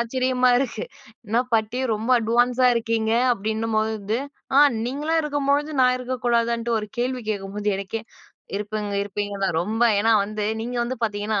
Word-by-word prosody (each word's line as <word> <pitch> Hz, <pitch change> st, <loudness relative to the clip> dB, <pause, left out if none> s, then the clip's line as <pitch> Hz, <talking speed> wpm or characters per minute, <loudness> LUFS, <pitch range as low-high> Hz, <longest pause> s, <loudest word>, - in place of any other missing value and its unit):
ஆச்சரியமா 255 Hz, +1 st, +1 dB
இருக்கு. 245 Hz, -5 st, -2 dB, 0.4 s
என்ன 230 Hz, +3 st, +2 dB
பாட்டி 225 Hz, +3 st, 0 dB
ரொம்ப 225 Hz, +4 st, -3 dB
அட்வான்ஸா 245 Hz, +3 st, +2 dB
இருக்கீங்க. 225 Hz, -1 st, 0 dB, 0.2 s
அப்பிடின்னும்போது 220 Hz, 0 st, -1 dB, 0.4 s
"ஆ -, -, +9 dB, 0.3 s
நீங்கலாம் 300 Hz, +5 st, 0 dB
இருக்கும்பொழுது, 290 Hz, 0 st, 0 dB
நான் 250 Hz, 0 st, +4 dB
இருக்கக்கூடாதா" 240 Hz, -2 st, 0 dB
ன்ட்டு 235 Hz, -1 st, 0 dB
ஒரு 210 Hz, -, -7 dB
கேள்வி 250 Hz, 0 st, -1 dB
கேட்கும்போது 205 Hz, +1 st, -3 dB
எனக்கே 205 Hz, +3 st, -4 dB, 0.6 s
இருப்பீங்க 210 Hz, 0 st, -4 dB
இருப்பீங்க 205 Hz, 0 st, -4 dB
தான். 170 Hz, -4 st, 0 dB
ரொம்ப 220 Hz, +5 st, -1 dB, 0.2 s
ஏன்னா 225 Hz, +2 st, +3 dB
வந்து 210 Hz, 0 st, -3 dB, 0.2 s
நீங்க 245 Hz, +1 st, -4 dB
வந்து 255 Hz, 0 st, -4 dB
பார்த்தீங்கன்னா, 205 Hz, -1 st, -1 dB
225 Hz, 140 wpm, -23 LUFS, 215-250 Hz, 0.6 s, ஆ